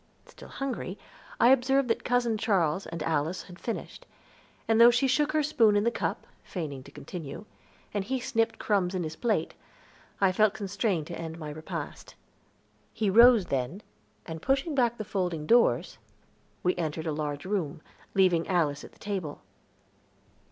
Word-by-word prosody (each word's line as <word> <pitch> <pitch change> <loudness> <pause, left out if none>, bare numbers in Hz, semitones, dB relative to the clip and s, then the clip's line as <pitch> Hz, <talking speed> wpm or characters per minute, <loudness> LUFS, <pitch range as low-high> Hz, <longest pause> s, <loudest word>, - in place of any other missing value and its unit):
Still - - -14
hungry, 245 -8 -4 0.4
I 240 - +6
observed 265 +1 +4
that 230 - 0
Cousin 245 -2 +1
Charles 190 -5 +1
and 165 -2 -5
Alice 160 +3 -1
had 180 -1 -13
finished; 250 - -6 0.6
and 225 0 +4
though 235 - +10
she 245 +2 +2
shook 295 +3 +2
her 310 -1 +2
spoon 230 -8 +4
in 205 - +3
the 235 - +2
cup, - - -3 0.2
feigning 150 -7 -5
to 140 - -13
continue, 145 +4 -8 0.5
and 205 -2 -1
he 260 +6 -2
snipped 225 -2 0
crumbs 190 -3 0
in 180 - -1
his 160 0 -5
plate, 210 -6 0 0.7
I 195 -2 +4
felt 210 +2 +3
constrained 200 -4 -1
to 170 +1 -7
end 165 0 -6
my 155 -2 -6
repast. 155 +1 -7 0.8
He 215 -3 0
rose 235 -1 +7
then, 135 +9 -3 0.4
and 160 -1 -7
pushing 270 +4 0
back 240 -3 +2
folding 180 -6 -2
doors, 235 +7 +3 0.6
we 180 - +2
entered 160 -1 -3
a 160 - -1
large 145 0 -3
room, 175 -7 -2 0.3
leaving 180 -4 +3
Alice 155 -6 +1
at - - -12
the - - -21
table. 190 -8 -4
195 Hz, 160 wpm, -28 LUFS, 160-235 Hz, 0.8 s, though